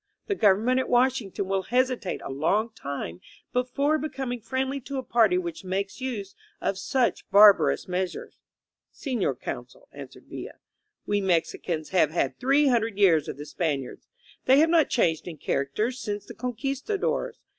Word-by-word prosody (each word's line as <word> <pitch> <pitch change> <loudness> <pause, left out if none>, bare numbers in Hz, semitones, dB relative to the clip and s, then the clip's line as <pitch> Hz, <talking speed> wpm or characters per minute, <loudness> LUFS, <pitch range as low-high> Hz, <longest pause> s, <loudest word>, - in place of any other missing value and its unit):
The 405 - -1
government 225 - +3
at 260 - -2
Washington 245 -6 +1
will 195 0 0
hesitate 250 -2 0
a - - -5
long 200 +11 0
time 140 - -6 0.3
before 275 +5 +1
becoming 265 -5 -4
friendly 265 +4 -2
to 275 +1 -6
a 260 - -3
party 225 -7 +3
which 170 -2 -4
makes 195 +5 -3
use 215 -7 -4 0.3
of 195 - -2
such 250 +4 0
barbarous 205 0 +6
measures." 185 0 -4 0.5
"Senor 260 -5 -2
Consul," - - -8
answered - - -11
Villa, - - -8 0.5
"we 205 0 0
Mexicans 170 -3 -1
have 180 -5 +3
had 170 - -1
three 275 +3 +3
hundred 230 -4 +1
years 170 -7 +4
of - - -5
the 145 - -7
Spaniards. 150 -4 -3 0.4
They 260 +1 +6
have 320 +3 +4
not 330 -3 +4
changed 165 -10 +1
in 165 -3 -7
character 140 - -1
since 210 -5 -5
the - - -9
Conqvistadores. 275 - -2
220 Hz, 155 wpm, -26 LUFS, 185-260 Hz, 0.5 s, barbarous